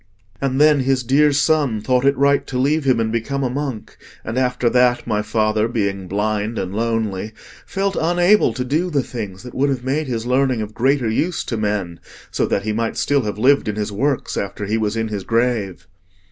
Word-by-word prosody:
And 135 Hz, -1 st, 0 dB
then 150 Hz, -1 st, +5 dB
his 130 Hz, -1 st, +1 dB
dear 145 Hz, +5 st, +4 dB
son 145 Hz, -5 st, +2 dB
thought 125 Hz, +4 st, +1 dB
it 140 Hz, -1 st, +3 dB
right 140 Hz, +1 st, +2 dB
to 130 Hz, -, -3 dB
leave 145 Hz, +3 st, +1 dB
him 130 Hz, -3 st, +3 dB
and 110 Hz, -1 st, 0 dB
become 135 Hz, +5 st, -2 dB
a 125 Hz, -, -1 dB
monk; 135 Hz, -5 st, -5 dB, 0.3 s
and 110 Hz, -, -4 dB
after 125 Hz, -1 st, 0 dB
that, 120 Hz, 0 st, +3 dB
my 105 Hz, -1 st, 0 dB
father, 110 Hz, 0 st, +1 dB
being 100 Hz, -5 st, -2 dB
blind 105 Hz, +3 st, -1 dB
and 95 Hz, +1 st, -3 dB
lonely, 110 Hz, -2 st, -2 dB, 0.3 s
felt 195 Hz, -1 st, -1 dB
unable 175 Hz, +5 st, +3 dB
to 125 Hz, -, -3 dB
do 160 Hz, +8 st, 0 dB
the 145 Hz, -5 st, 0 dB
things 105 Hz, -6 st, -7 dB
that 125 Hz, -, -10 dB
would 140 Hz, +2 st, +1 dB
have 130 Hz, -3 st, -2 dB
made 140 Hz, +3 st, -1 dB
his 115 Hz, -3 st, -3 dB
learning 130 Hz, -1 st, +1 dB
of 105 Hz, 0 st, -8 dB
greater 130 Hz, +1 st, +1 dB
use 160 Hz, +11 st, -1 dB
to 115 Hz, -, -4 dB
men, 105 Hz, -6 st, -2 dB, 0.3 s
so -, -, 0 dB
that 100 Hz, -, -1 dB
he 110 Hz, 0 st, -1 dB
might 115 Hz, +1 st, -2 dB
still 145 Hz, -1 st, +2 dB
have 105 Hz, -3 st, -4 dB
lived 130 Hz, +3 st, +3 dB
in 105 Hz, -, -2 dB
his 105 Hz, 0 st, -3 dB
works 135 Hz, +7 st, -1 dB
after 100 Hz, +1 st, -4 dB
he 105 Hz, +2 st, -1 dB
was 110 Hz, 0 st, -1 dB
in 115 Hz, 0 st, -1 dB
his 100 Hz, -3 st, -4 dB
grave." 115 Hz, -5 st, -1 dB
120 Hz, 210 wpm, -20 LUFS, 110-140 Hz, 0.3 s, then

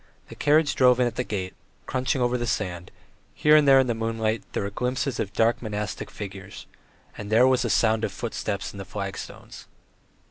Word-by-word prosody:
The -, -, -10 dB
carriage 150 Hz, -1 st, +3 dB
drove 125 Hz, -1 st, +4 dB
in 125 Hz, -, +4 dB
at 120 Hz, -, -1 dB
the 125 Hz, -, -1 dB
gate, 95 Hz, -5 st, -4 dB, 0.3 s
crunching 130 Hz, 0 st, -1 dB
over 120 Hz, 0 st, +1 dB
the 120 Hz, -1 st, -2 dB
sand; 90 Hz, -6 st, -3 dB, 0.5 s
here 150 Hz, 0 st, +5 dB
and 150 Hz, -2 st, +5 dB
there 135 Hz, -1 st, +7 dB
in 130 Hz, -, +3 dB
the 120 Hz, -, 0 dB
moonlight 115 Hz, -1 st, -1 dB
there -, -, -1 dB
were 100 Hz, -, -4 dB
glimpses 125 Hz, +3 st, -2 dB
of 100 Hz, -, -2 dB
dark 115 Hz, +3 st, +1 dB
monastic 105 Hz, -2 st, -4 dB
figures, 100 Hz, -1 st, -9 dB, 0.5 s
and 105 Hz, -1 st, -6 dB
there 115 Hz, +3 st, +6 dB
was 130 Hz, -1 st, +3 dB
the -, -, -1 dB
sound 110 Hz, -1 st, +2 dB
of 100 Hz, -, -1 dB
footsteps 100 Hz, -1 st, -4 dB
on 100 Hz, -, -9 dB
the -, -, -5 dB
flag 100 Hz, -1 st, -5 dB
stones. -, -, -10 dB
115 Hz, 205 wpm, -25 LUFS, 100-125 Hz, 0.5 s, there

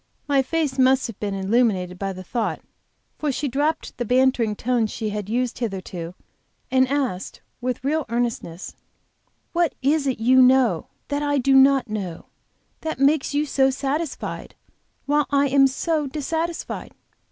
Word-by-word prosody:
My 280 Hz, -2 st, +3 dB
face 285 Hz, -1 st, -1 dB
must 260 Hz, +1 st, +4 dB
have 230 Hz, -5 st, -7 dB
been 200 Hz, -2 st, -2 dB
illuminated 190 Hz, -3 st, +1 dB
by 195 Hz, -1 st, -2 dB
the 185 Hz, 0 st, -8 dB
thought, 225 Hz, +4 st, -2 dB, 0.6 s
for 300 Hz, -2 st, 0 dB
she 285 Hz, +2 st, -2 dB
dropped 290 Hz, +2 st, -1 dB
the -, -, +1 dB
bantering 250 Hz, -2 st, +2 dB
tone 240 Hz, 0 st, 0 dB
she 215 Hz, 0 st, -4 dB
had 210 Hz, -1 st, -4 dB
used 245 Hz, +1 st, -1 dB
hitherto, 185 Hz, -6 st, -5 dB, 0.6 s
and 260 Hz, 0 st, +4 dB
asked, 260 Hz, -9 st, -2 dB, 0.2 s
with 250 Hz, 0 st, -3 dB
real 300 Hz, +2 st, 0 dB
earnestness: 230 Hz, -7 st, -3 dB, 0.8 s
"What 340 Hz, -1 st, +1 dB
is 285 Hz, +1 st, +2 dB
it 260 Hz, -, -1 dB
you 255 Hz, +3 st, +5 dB
know, 250 Hz, -9 st, +4 dB
and -, -, -44 dB
that 285 Hz, 0 st, -1 dB
I 290 Hz, -1 st, +1 dB
do 270 Hz, +1 st, +2 dB
not 270 Hz, -1 st, +5 dB
know, 195 Hz, -6 st, -5 dB, 0.5 s
that 320 Hz, 0 st, -4 dB
makes 285 Hz, +1 st, +2 dB
you 295 Hz, +1 st, +2 dB
so 270 Hz, -2 st, +2 dB
satisfied, 280 Hz, +3 st, -3 dB, 0.5 s
while 295 Hz, 0 st, +2 dB
I 280 Hz, -1 st, +2 dB
am 275 Hz, 0 st, +5 dB
so 300 Hz, +2 st, -1 dB
dissatisfied?" 320 Hz, +4 st, -4 dB
260 Hz, 155 wpm, -23 LUFS, 225-285 Hz, 0.8 s, you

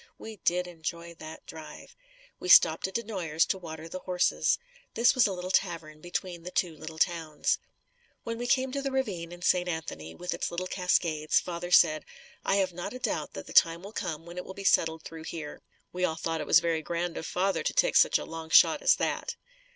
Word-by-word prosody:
We 220 Hz, -1 st, -9 dB
did 180 Hz, 0 st, +1 dB
enjoy 170 Hz, 0 st, -6 dB
that 155 Hz, 0 st, -10 dB
drive. 160 Hz, -1 st, -11 dB, 0.4 s
We 180 Hz, -, -5 dB
stopped 160 Hz, 0 st, +7 dB
at 190 Hz, -, -11 dB
DeNoyers 185 Hz, -9 st, 0 dB
to 190 Hz, -, 0 dB
water 160 Hz, -2 st, -8 dB
the 185 Hz, +3 st, -6 dB
horses. 180 Hz, -1 st, +1 dB, 0.4 s
This 235 Hz, +1 st, +5 dB
was 255 Hz, -4 st, +4 dB
a -, -, -2 dB
little 180 Hz, 0 st, -4 dB
tavern 165 Hz, -5 st, -1 dB
between 175 Hz, 0 st, -4 dB
the 175 Hz, -, -7 dB
two 175 Hz, -3 st, -1 dB
little 155 Hz, +1 st, -9 dB
towns. 160 Hz, -3 st, 0 dB, 0.6 s
When 230 Hz, 0 st, -4 dB
we 245 Hz, -, -3 dB
came 260 Hz, +1 st, +2 dB
to 280 Hz, +1 st, -2 dB
the 275 Hz, -, -2 dB
ravine 200 Hz, -11 st, -2 dB
in 175 Hz, 0 st, -10 dB
St. 180 Hz, -1 st, +2 dB
Anthony, 80 Hz, -, -5 dB
with 180 Hz, -, -4 dB
its -, -, -2 dB
little 175 Hz, +1 st, -3 dB
cascades, 170 Hz, -4 st, +1 dB
father 175 Hz, 0 st, -5 dB
said, 155 Hz, -3 st, +5 dB, 0.4 s
"I -, -, +2 dB
have 190 Hz, -2 st, +1 dB
not 175 Hz, +5 st, -5 dB
a -, -, -4 dB
doubt -, -, -2 dB
that -, -, -7 dB
the -, -, -10 dB
time 170 Hz, +1 st, +5 dB
will 200 Hz, +2 st, -9 dB
come 160 Hz, -5 st, -4 dB
when 170 Hz, +1 st, -10 dB
it -, -, -5 dB
will 190 Hz, -, -10 dB
be 200 Hz, -, -7 dB
settled 160 Hz, -4 st, +2 dB
through 160 Hz, -1 st, -9 dB
here." 150 Hz, -3 st, -7 dB, 0.3 s
We 180 Hz, 0 st, -3 dB
all 165 Hz, -3 st, +1 dB
thought 165 Hz, -1 st, -2 dB
it 150 Hz, -, -5 dB
was 175 Hz, -, +6 dB
very 165 Hz, -2 st, 0 dB
grand 170 Hz, +1 st, -3 dB
of 160 Hz, -, -5 dB
father 190 Hz, +2 st, 0 dB
to -, -, -1 dB
take -, -, +3 dB
such -, -, +6 dB
a -, -, -6 dB
long 165 Hz, 0 st, -7 dB
shot -, -, +6 dB
as -, -, +5 dB
that. -, -, -2 dB
175 Hz, 220 wpm, -29 LUFS, 160-185 Hz, 0.6 s, stopped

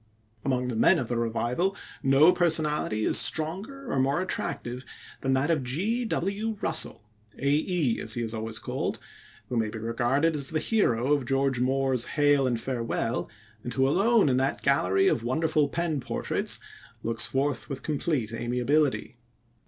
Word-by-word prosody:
Among 125 Hz, -2 st, 0 dB
the 120 Hz, -, -3 dB
men 110 Hz, -, +5 dB
of 120 Hz, -, -3 dB
the 120 Hz, -, -1 dB
Revival, 120 Hz, -, -1 dB, 0.2 s
no 145 Hz, +5 st, +5 dB
personality 150 Hz, -10 st, +1 dB
is -, -, +4 dB
stronger 205 Hz, -, 0 dB
or 135 Hz, -, 0 dB
more 135 Hz, +4 st, +1 dB
attractive 125 Hz, -8 st, -3 dB, 0.4 s
than 135 Hz, -, 0 dB
that 135 Hz, +5 st, +1 dB
of 155 Hz, -4 st, +1 dB
G.W. 205 Hz, -, -1 dB
Russell 160 Hz, -9 st, 0 dB, 0.3 s
"Æ", 145 Hz, -1 st, +1 dB
as 110 Hz, -, -1 dB
he 120 Hz, -, -2 dB
is 110 Hz, 0 st, -3 dB
always 110 Hz, 0 st, -4 dB
called -, -, -3 dB, 0.5 s
who 125 Hz, -, -2 dB
may 110 Hz, -1 st, 0 dB
be 110 Hz, -, -7 dB
regarded 120 Hz, +8 st, 0 dB
as 140 Hz, -3 st, 0 dB
the 160 Hz, -, -1 dB
hero 140 Hz, -, +1 dB
of 140 Hz, -4 st, -1 dB
George 135 Hz, -1 st, +1 dB
Moore's 130 Hz, -1 st, +1 dB
Hail 145 Hz, -2 st, +4 dB
and 120 Hz, -2 st, 0 dB
Farewell, 115 Hz, -2 st, -2 dB, 0.3 s
and 120 Hz, -, -6 dB
who 130 Hz, 0 st, +3 dB
alone 205 Hz, -, +3 dB
in 130 Hz, -2 st, +2 dB
that 135 Hz, +1 st, -1 dB
gallery 95 Hz, -9 st, +3 dB
of 115 Hz, -, +1 dB
wonderful 150 Hz, +3 st, +1 dB
pen 165 Hz, -1 st, -1 dB
portraits -, -, 0 dB, 0.5 s
looks 115 Hz, +1 st, 0 dB
forth 135 Hz, -1 st, -1 dB
with 135 Hz, -2 st, -5 dB
complete 145 Hz, -7 st, -1 dB
amiability. 125 Hz, +3 st, 0 dB
135 Hz, 160 wpm, -27 LUFS, 120-160 Hz, 0.5 s, men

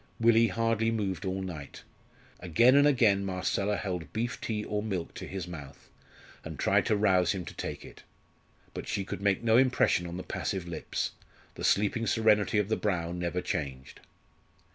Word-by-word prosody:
Willie 115 Hz, 0 st, +5 dB
hardly 115 Hz, 0 st, +1 dB
moved 105 Hz, -4 st, -2 dB
all 95 Hz, 0 st, -2 dB
night. 80 Hz, -7 st, -8 dB, 0.6 s
Again 90 Hz, +9 st, +4 dB
and 145 Hz, +1 st, +6 dB
again 110 Hz, -8 st, +3 dB
Marcella 100 Hz, +2 st, -1 dB
held 90 Hz, -4 st, -4 dB
beef 115 Hz, +2 st, -3 dB
tea 105 Hz, -2 st, -3 dB
or 105 Hz, 0 st, -2 dB
milk 95 Hz, -6 st, -4 dB
to -, -, -7 dB
his 95 Hz, -3 st, -5 dB
mouth, 70 Hz, -5 st, -10 dB, 0.5 s
and -, -, -7 dB
tried -, -, +2 dB
to 110 Hz, -, +3 dB
rouse 95 Hz, -4 st, +3 dB
him 90 Hz, -3 st, -5 dB
to -, -, -8 dB
take -, -, -6 dB
it, -, -, -13 dB, 0.7 s
but -, -, -6 dB
she 100 Hz, -, -2 dB
could 95 Hz, -, -6 dB
make 100 Hz, +2 st, +1 dB
no 115 Hz, 0 st, +4 dB
impression 125 Hz, -8 st, +3 dB
on 85 Hz, +1 st, -6 dB
the 90 Hz, -, -5 dB
passive 95 Hz, -3 st, -3 dB
lips; 85 Hz, -, -3 dB, 0.4 s
the -, -, -8 dB
sleeping 110 Hz, +3 st, +2 dB
serenity 110 Hz, -2 st, +3 dB
of 105 Hz, -2 st, +2 dB
the 110 Hz, -, 0 dB
brow 90 Hz, -5 st, -1 dB
never 90 Hz, 0 st, -2 dB
changed. 65 Hz, -6 st, -4 dB
100 Hz, 175 wpm, -29 LUFS, 90-110 Hz, 0.7 s, and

